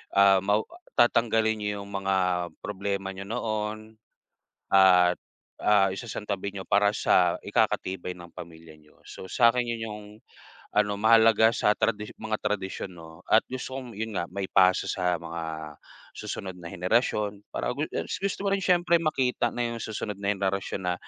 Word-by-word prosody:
ah, 100 -1 +6
mawa 105 +2 +2 0.3
tatanggalin 110 -2 +3
nyo 105 0 -2
yung 100 - -12
mga 95 0 0 0.5
problema 100 -1 -3
nyo 100 +1 -7
noon 110 -1 -2 0.9
at, 90 -2 +6 0.5
ah, 105 -2 +5
isasantabi 100 -2 -4
nyo 95 -2 -7
para 100 0 +4
sa - - +3
ikakatibay 90 -1 0
ng 85 0 -11
pamilya 80 -1 -11
nyo. 75 0 -24
So, 95 - -9
sakin, 120 0 +4
'yon 115 -1 -4
yung 105 0 -7 0.7
ano, 105 -1 +2
mahalaga 110 0 +6
sa 105 - +2
tradisyo 105 -1 -1
mga 110 -1 -2
tradisyon, 100 -2 -3
'no, 80 -1 -12
at - - +5
gusto 130 0 -5
kong, 125 -3 -8
'yon 110 -1 -4
nga, 85 - 0
maipasa 95 -1 +2
sa 90 -1 0
mga 80 -2 -6 0.4
susunod 95 -2 -6
na 85 - -8
henerasyon 105 +2 0
para - - -2
gu - - -2 0.4
gusto 200 -1 -2
mo - - +3
rin 195 - -1
syempre 175 -2 +3
makita 135 -5 +1
na 120 - -2
yung 115 -1 -4
susunod 105 -1 -4
na 100 0 +1
henerasyon 95 0 -2
na 90 - +1
100 Hz, 155 wpm, -27 LUFS, 95-110 Hz, 0.9 s, ah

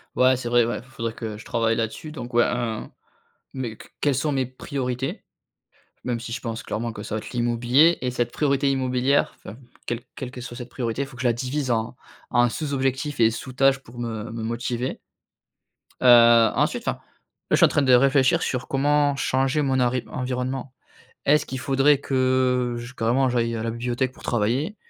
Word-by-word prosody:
Ouais, 130 0 +4
c'est 120 - -5
vrai, 120 0 +4
ouais, 115 -1 -2
f 120 - -15
faudrait 115 -3 -5
que 110 -2 -6
je 110 - -12
travaille 115 -1 +1
là-dessus 115 +7 -4
donc 125 -5 -7
ouais 120 - +6
un 120 -3 -2 0.6
mais 120 -4 -4
que - - -13
quelles 145 - +3
sont 150 +3 0
mes 135 -2 0
priorités? 130 0 -4 0.8
Même 120 -2 -1
si 115 0 -7
je - - -4
pense 115 -2 -5
clairement 115 +2 -3
que 105 - -8
ça 105 - -4
va - - -1
être - - -10
l'immobilier 120 +7 +3
et 125 0 -1
cette 120 -1 -1
priorité 140 -1 +1
immobilière, 130 +1 +1
enfin, 105 - -11 0.3
quel 120 0 -2
quelque 125 -1 -7
soit 120 0 -8
cette 125 -1 -8
priorité. 120 +1 -2
Il - - -7
faut 135 -3 -13
que 125 - -5
la 120 - +5
divise 130 +3 -2
en 115 +1 -1 0.4
en 120 0 +4
sous-objectif 140 0 -2
et 115 0 +5
sous-tâche 135 +4 +1
pour 120 -2 -15
me 115 -2 -4
me 115 0 -5
motiver. 120 +2 -3 1.0
Heu, 120 -2 +7
ensuite - - 0
enfin, - - -1
là, - - -27 0.5
je - - +6
suis - - +7
en - - +5
train - - +1
de 130 -2 +4
réfléchir 135 +1 +4
sur 125 0 -2
comment 145 +1 +2
changer 135 +2 +1
mon 135 -2 +1
ari 125 0 +1
environnement. 130 +1 -3 0.5
Est-ce 150 +2 +3
qu'il 130 - -5
faudrait 135 +1 +3
que 130 -2 +1
j 120 +1 -8
carrément, 125 +3 +2
j'aille 115 -2 0
à 110 - -3
la 115 - -2
bibliothèque 120 +2 -2
pour - - -17
travailler? 125 - 0
125 Hz, 195 wpm, -24 LUFS, 120-135 Hz, 1.0 s, Heu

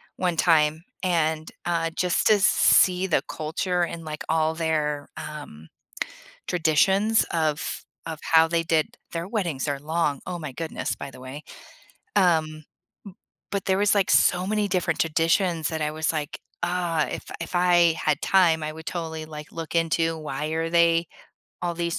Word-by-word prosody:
1 180 -3 -1
time, 155 -1 +3 0.2
and, 160 -3 0
uh, 165 -1 0
just 180 -1 +1
to - - +7
s 205 -1 +3
see 185 -2 +4
the 175 - +1
culture 175 +3 -2
and, 165 -1 -5
like, 155 -1 -5
all 160 0 +2
their, 150 -3 -1
um, 145 - -8 0.8
traditions 190 +6 +3
of 155 -2 -1 0.2
of 160 -2 -5
how 160 0 +6
they 170 0 +1
did 160 -2 +2 0.3
their 165 0 -3
weddings 170 - -2
are 140 -2 -2
long. 150 -2 -1
Oh 180 -1 -3
my 150 -4 -6
goodness, 160 +4 -4
by 140 - -7
the 130 - -13
way, 135 +4 -8 0.7
um, 175 -5 +4
m 155 0 -11 0.9
but 200 -2 -2
there 190 0 +2
was, 205 0 +3
like, 200 -2 +2
so 180 +1 +4
many 210 0 0
different 180 -3 0
traditions 165 +1 +1
that 160 -1 -3
I 150 - 0
was, 160 +1 -1
like, 155 0 -4 0.2
"Ah, 175 -3 0
if - - -5 0.2
if 170 - -6
I 175 -2 +4
had 150 -1 +1
time, 170 -5 +4
I 155 - -3
would 160 0 -11
totally, 160 -3 -4
like, 150 -1 -9
look 165 0 -6
into 165 0 +1
why 150 -1 -4
are 165 +1 -1
they 170 0 +4 0.6
all 175 -1 -1
these 170 0 -2
165 Hz, 170 wpm, -25 LUFS, 155-175 Hz, 0.9 s, to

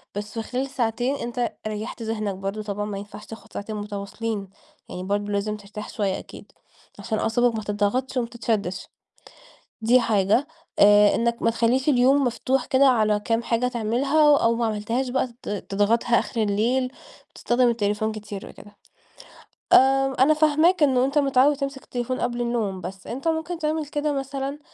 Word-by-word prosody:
بس 205 +1 -5
في 225 - -3
خلال 255 +4 -3
ساعتين 245 0 -1
أنت 240 -2 -3
ريّحت 215 +2 -5
ذهنك 215 -3 -2
برضه، 195 +3 -4
طبعًا 205 0 -3
ما 205 -2 -5
ينفعش 205 +1 -9
تاخد 225 0 -12
ساعتين 215 +1 -5
متواصلين، 205 0 -5 0.4
يعني 180 - -6
برضه 205 +2 -2
لازم 210 +1 -1
ترتاح 210 +1 -9
شوية 200 -3 -2
أكيد، - - -13 0.5
عشان 220 -2 -2
أعصابك 240 +1 +1
ما 215 - -3
تِضغطش 210 +6 -1
وما 240 -2 0
تتشدِّش. 220 -6 -3 1.0
دي 245 +3 +5
حاجة 215 +3 +2 0.3
آآ 205 0 +6
إنَّك 235 0 0
ما 230 - +3
تخليش 240 +4 +1
اليوم 270 +1 +4
مفتوح 255 +2 0
كده 270 +1 +4
على 215 -4 +3
كام 225 +2 0
حاجة 235 +1 0
تعملها، 255 +6 +2
و 290 - +7
أو 230 -3 +2
ما 235 0 0
عملتهاش 225 +4 -2
بقى 260 +1 0
ت - - -8
تضغطها 205 +4 +1
آخر 230 - -3
الليل، 235 +5 0 0.4
تستخدم 245 +1 +2
التليفون 215 -1 0
كتير 210 -2 -8
وكده. 205 0 -15 1.0
آآ 270 0 +5
أنا 275 +4 +6
فاهماك 310 +3 +3
إن 265 -3 +3
أنت 270 +4 +1
متعود 275 +1 +3
تمسك 275 -1 -4
التليفون 250 +1 -3
قبل 240 0 -1
النوم، 225 -6 -2
بس 185 +2 -8
أنت 265 +7 -5
ممكن 320 +1 -2
تعمل 310 -1 -1
كده 295 0 -1
مثلًا، 275 +1 -4
235 Hz, 165 wpm, -24 LUFS, 210-265 Hz, 1.0 s, و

